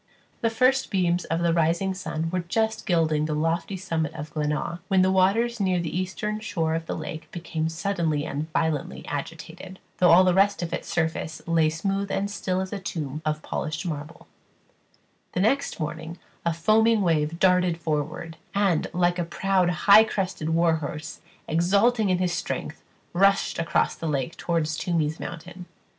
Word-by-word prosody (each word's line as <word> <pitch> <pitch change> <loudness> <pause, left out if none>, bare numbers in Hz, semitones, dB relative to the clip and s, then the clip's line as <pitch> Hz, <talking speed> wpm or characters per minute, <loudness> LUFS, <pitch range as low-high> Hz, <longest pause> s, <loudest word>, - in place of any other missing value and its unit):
The 230 - +2
first 255 +4 +2
beams 180 -3 +1
of 165 +1 -1
the 170 -1 +2
rising 170 +3 +1
sun 165 -3 -4
were 185 - 0
just 220 +6 -1
gilding 160 -4 +2
the 155 -1 -2
lofty 165 +5 -1
summit 165 -4 -2
of 150 +1 -7
Glenaa, 150 +3 -2
when 190 -2 +4
the 190 - +3
waters 220 +6 +2
near 185 -3 +1
the 170 -2 -3
eastern 200 +4 -2
shore 170 -8 -1
of 165 0 -3
the - - -2
lake 160 -4 -7
became 160 -2 -3
suddenly 165 -4 -1
and 155 +3 -4
violently 160 -3 -1
agitated, 165 +5 -6 0.2
though 180 - +5
all 175 +3 +8
the 185 -1 +3
rest 195 0 +3
of 170 0 -4
its - - -4
surface 160 -1 -2
lay 165 -2 +3
smooth 195 +5 -2
and 200 +1 -1
still 185 -2 -1
as 190 +1 -5
a 200 - -3
tomb 155 -6 -4
of 155 0 -2
polished 155 +3 -3
marble, 155 -1 -6 1.1
the - - -1
next 270 +6 +1
morning 160 +2 -5 0.3
a - - +3
foaming 215 +6 +3
wave 160 -2 +1
darted 180 -2 +3
forward, 160 0 -3 0.2
and, 195 -5 +2
like 175 0 +1
a - - +1
proud 185 +1 +1 0.2
high 210 +2 +9
crested 185 -7 -3
war 165 0 +3
horse, 155 +1 -6 0.3
exulting 200 +7 +3
in 185 - +3
his 180 -1 0
strength, 170 - -4 0.3
rushed 195 +1 +3
across 165 - +1
the 165 - -5
lake 145 +1 -2
toward 165 -2 0
Toomies 155 0 -1
mountain. 180 +1 -8
170 Hz, 170 wpm, -25 LUFS, 160-190 Hz, 1.1 s, high